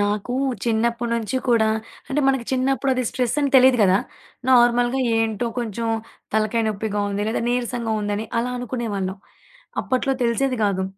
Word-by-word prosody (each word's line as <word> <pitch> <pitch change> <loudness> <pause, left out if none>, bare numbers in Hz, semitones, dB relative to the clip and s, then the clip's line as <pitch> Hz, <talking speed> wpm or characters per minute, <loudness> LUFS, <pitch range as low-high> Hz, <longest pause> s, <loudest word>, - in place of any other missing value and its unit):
నాకు 205 +3 -1 0.3
చిన్నప్పుడి 235 +1 0
నుంచి 230 +2 -2
కూడా 225 -2 +4 0.4
అంటే 280 +2 0
మనకు 265 -3 +1
చిన్నప్పుడు 270 +1 +1
అది 255 0 -1
స్ట్రెస్సని 270 +3 0
తెలీదు 260 -1 +6
గదా! 190 -1 +4 0.5
నార్మల్‌గా 245 +1 +4 0.2
ఏంటో 225 +1 0
కొంచెం 230 -1 -3 0.5
తలకాయ 220 +1 +1
నొప్పిగా 210 0 -2
ఉంది. 200 +1 -2
లేదా 225 - -1
నీరసంగా 240 -2 -1
ఉందని 205 +1 -2
అలా 250 +1 -2
అనుకునేవాళ్ళం. 215 -6 -3 0.6
అప్పట్లో 265 +1 0
తెలిసేది 250 +2 +1
గాదు. 190 -2 0
235 Hz, 135 wpm, -22 LUFS, 215-250 Hz, 0.6 s, తెలీదు